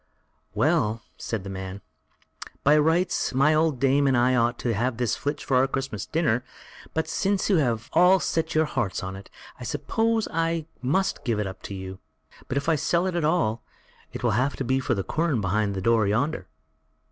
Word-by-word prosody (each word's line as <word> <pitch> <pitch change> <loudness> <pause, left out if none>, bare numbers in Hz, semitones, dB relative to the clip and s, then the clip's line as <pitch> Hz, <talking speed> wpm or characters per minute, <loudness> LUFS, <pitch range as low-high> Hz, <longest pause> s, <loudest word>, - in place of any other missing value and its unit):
"Well!" 110 +1 +1
said 110 -4 -4
the 100 - -7
man, 95 +1 -6 0.8
"by 145 +2 +5
rights, 160 0 +1
my 145 +4 +4
old 155 -4 +2
dame 140 +2 +3
and 130 -2 +3
I 125 +1 +3
ought 120 -1 +2
to 120 - +2
have 120 +3 -1
this 120 -3 0
flitch 145 +1 -4
for 130 - +2
our 130 +1 +4
Christmas 135 -6 -4
dinner; 145 -7 +1 0.5
but 160 - 0
since 200 0 0
you 190 - +5
have 115 -7 0
all 180 +3 +6
set 165 -2 -1
your 160 0 +4
hearts 120 -10 -2
on 95 0 -5
it, 95 0 -11 0.3
I - - -8
suppose 225 0 0
I 165 -1 0 0.2
must 185 +10 0
give 115 -5 0
it 105 - 0
up 95 0 -7
to 100 - -5
you; 95 0 -7 0.5
but 135 - -2
if 140 - -2
I 165 -2 +3
sell 170 +5 +1
it 185 -2 -2
at 170 - 0
all, 150 -9 +1 0.6
I'll - - +3
have 130 +7 +1
for - - -3
it 130 0 0
the 100 - -2
quern 155 - 0
behind 100 +1 0
the 95 - -3
door 115 0 +3
yonder." 110 -1 -1
130 Hz, 195 wpm, -25 LUFS, 110-160 Hz, 0.8 s, all